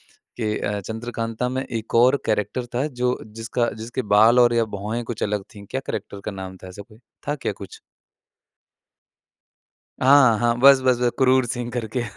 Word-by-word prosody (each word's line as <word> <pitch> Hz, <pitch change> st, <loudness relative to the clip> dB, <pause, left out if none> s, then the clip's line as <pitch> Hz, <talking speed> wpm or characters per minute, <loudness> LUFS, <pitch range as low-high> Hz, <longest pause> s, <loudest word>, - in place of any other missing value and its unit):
कि 110 Hz, -3 st, -4 dB
अ, 105 Hz, 0 st, -2 dB
चंद्रकांता 115 Hz, +3 st, -4 dB
में 130 Hz, +1 st, -2 dB
एक 115 Hz, -2 st, -5 dB
और 125 Hz, +4 st, +5 dB
कैरेक्टर 110 Hz, +3 st, -1 dB
था 130 Hz, +4 st, +1 dB
जो 125 Hz, -3 st, -1 dB
जिसका 115 Hz, +2 st, -2 dB
जिसके 120 Hz, +3 st, -4 dB
बाल 115 Hz, +4 st, +6 dB
और 120 Hz, -1 st, +5 dB
या 115 Hz, -1 st, +2 dB
भौएँ 110 Hz, +4 st, -3 dB
कुछ 115 Hz, -1 st, -5 dB
अलग 105 Hz, -1 st, -1 dB
थीं। 100 Hz, -1 st, -11 dB
क्या 130 Hz, -, -2 dB
कैरेक्टर 100 Hz, -1 st, -5 dB
का 105 Hz, -, -3 dB
नाम 95 Hz, -1 st, -8 dB
था -, -, -8 dB
ऐसा 95 Hz, +2 st, -10 dB
कोई? 105 Hz, +1 st, -17 dB, 0.3 s
था 145 Hz, -, 0 dB
क्या 135 Hz, -, -3 dB
कुछ? 100 Hz, -1 st, -11 dB, 2.2 s
हाँ, 130 Hz, -4 st, +6 dB
हाँ। 120 Hz, -1 st, +2 dB
बस, 135 Hz, +1 st, +7 dB
बस, 130 Hz, -1 st, +3 dB
बस 125 Hz, -1 st, +1 dB
क्रूर 130 Hz, -1 st, +3 dB
सिंह 120 Hz, 0 st, -4 dB
करके। 120 Hz, 0 st, -3 dB
120 Hz, 180 wpm, -22 LUFS, 105-125 Hz, 2.2 s, बस